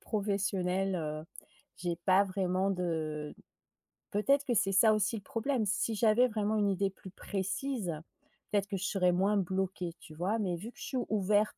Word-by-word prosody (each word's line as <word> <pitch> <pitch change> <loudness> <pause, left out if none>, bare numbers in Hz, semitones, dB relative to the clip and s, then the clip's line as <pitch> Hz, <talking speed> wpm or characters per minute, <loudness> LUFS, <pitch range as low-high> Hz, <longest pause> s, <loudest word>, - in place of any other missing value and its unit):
professionnelle, 195 -2 0
heu. 155 -1 -4 0.5
J'ai 175 -2 -2
pas 190 +2 +6
vraiment 190 0 0
de 160 -5 -2 0.8
peut-être 275 +8 +2
que 250 - +1
c'est 195 -3 +2
ça 215 +3 +6
aussi 215 +2 +1
le 210 - -5
problème. 230 +3 -1
Si 215 +2 0
j'avais 225 +3 +4
vraiment 215 -1 0
une 205 -1 +2
idée 195 +1 +1
plus 190 -1 -12
précise, 200 - -3 0.6
peut-être 200 -1 +1
que 205 - -3
je 185 - -5
serais 180 -3 +2
moins 195 +3 +2
bloquée, 190 -2 -1
tu 155 - -12
vois? 185 +8 -1
Mais 180 -5 -1
vu 220 +7 -8
que - - -26
je - - -7
suis 260 - -3
ouverte, 210 0 +2
195 Hz, 175 wpm, -32 LUFS, 180-215 Hz, 0.8 s, pas